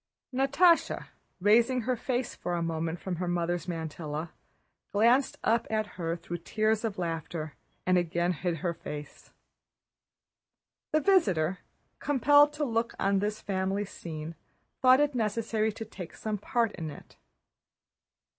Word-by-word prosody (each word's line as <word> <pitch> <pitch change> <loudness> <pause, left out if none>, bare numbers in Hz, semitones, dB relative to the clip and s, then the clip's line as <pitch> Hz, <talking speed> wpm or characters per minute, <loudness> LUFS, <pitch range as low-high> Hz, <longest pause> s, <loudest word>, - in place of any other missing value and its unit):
Natásha, 280 +7 +3 0.3
raising 235 +6 +4
her 250 +2 0
face 245 +1 -2
for 175 - -3
a 170 - -1
moment 165 0 -2
from 185 -3 -4
her 180 +1 -2
mother's 175 0 -1
mantilla, 160 -1 -4 0.6
glanced 240 +6 +3
up 230 +1 +2
at 215 0 0
her 165 -2 -2
through 175 0 -6
tears 215 +5 0
of 220 -3 -2
laughter, 165 -3 -3 0.3
and 185 0 +4
again 175 +1 0
hid 175 0 -2
her 170 - +1
face. 150 -2 -9 1.6
The 310 -1 +3
visitor, 190 - +3 0.4
compelled 290 +1 +5
to 300 0 -1
look 230 -2 -1
on 195 0 +2
at - - +1
this 210 +1 -2
family 195 +1 -1
scene, 160 -4 -7 0.5
thought 255 0 +7
it 295 -1 +2
necessary 220 -1 0
to 225 - -6
take 190 -5 -9
some 215 -2 -3
part 230 +2 +1
in 165 -5 -5
it. 145 - -12
200 Hz, 140 wpm, -29 LUFS, 170-235 Hz, 1.6 s, thought